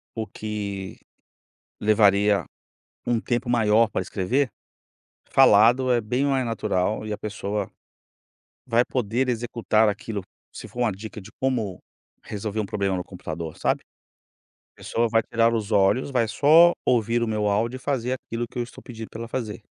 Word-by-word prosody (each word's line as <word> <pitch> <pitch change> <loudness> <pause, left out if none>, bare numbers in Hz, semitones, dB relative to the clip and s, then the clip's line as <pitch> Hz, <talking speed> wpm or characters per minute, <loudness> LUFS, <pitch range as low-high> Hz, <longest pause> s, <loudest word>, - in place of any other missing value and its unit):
O 110 -1 -2
que 100 -3 -5 0.8
levaria 105 -1 +4 0.6
um 120 -1 +1
tempo 120 +1 -2
maior 115 -1 +4
para - - -2
escrever, 125 +8 0 0.8
falado 125 +1 +5
é 120 - +3
bem 125 +5 -1
mais 135 -2 +1
natural 110 -2 -1
e 105 - -3
a 105 - -4
pessoa 105 -1 -4 1.0
vai 120 0 +3
poder 125 +1 -1
executar 115 -2 +1
aquilo, 105 0 -4 0.3
se - - -8
for 120 - -10
uma 120 -3 +2
dica 105 +2 -8
de 100 +3 -13
como 115 -8 -1 0.4
resolver 105 0 -4
um 105 - 0
problema 100 -2 -1
no 90 - -3
computador, 85 -4 -7
sabe. - - 0 1.0
A - - -21
pessoa 115 0 0
vai 115 0 +3
tirar 115 +1 +2
os 110 -1 -2
olhos, 105 +7 +3
vai 120 -4 +1
só 160 +8 +6
ouvir 115 0 +2
o 115 - 0
meu 105 -1 0
áudio 115 +5 0
e - - -10
fazer 130 -3 -1
aquilo 120 -2 -4
que 125 - -8
eu - - +1
estou 120 - -10
pedindo 115 -3 -8
pra 115 - -8
ela 115 - -6
fazer. 110 -6 -4
110 Hz, 165 wpm, -24 LUFS, 105-120 Hz, 1.0 s, só